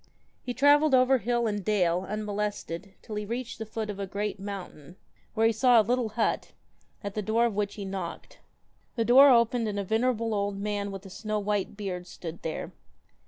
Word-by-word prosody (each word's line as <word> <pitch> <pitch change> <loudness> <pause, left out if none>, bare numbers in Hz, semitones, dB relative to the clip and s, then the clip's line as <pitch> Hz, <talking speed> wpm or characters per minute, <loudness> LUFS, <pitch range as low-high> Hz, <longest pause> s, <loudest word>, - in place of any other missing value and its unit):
He 245 - -5
travelled 290 +1 +5
over 255 +1 +4
hill 240 0 0
and 205 -2 -1
dale 180 -3 +1
unmolested 205 -3 -4
till 215 - -6
he 210 - -2
reached 235 +2 -5
the 220 - -5
foot 220 0 -4
of 205 -1 -6
a 195 - -3
great 200 +1 -3
mountain, 185 -5 -8 0.4
were 225 0 +3
he 225 - +5
saw 240 +1 +5
a - - +5
little 245 0 +1
hut, 225 - 0 0.5
at 200 -1 -4
the 215 - -2
door 220 +3 +2
of 235 - 0
which 205 -1 -1
he 200 - -6
knocked. 190 -3 -6 0.6
The 230 -2 0
door 270 +4 +8
opened 235 -1 +3
and 205 -1 -3
a 200 - -1
venerable 225 +2 0
old 200 -1 -1
man 205 0 -2
with 195 0 -8
a 195 - -10
snow 215 +2 -3
white 205 -1 -2
beard 185 -4 -5
stood 170 -1 -8
there. 160 - -4
210 Hz, 200 wpm, -28 LUFS, 200-230 Hz, 0.6 s, door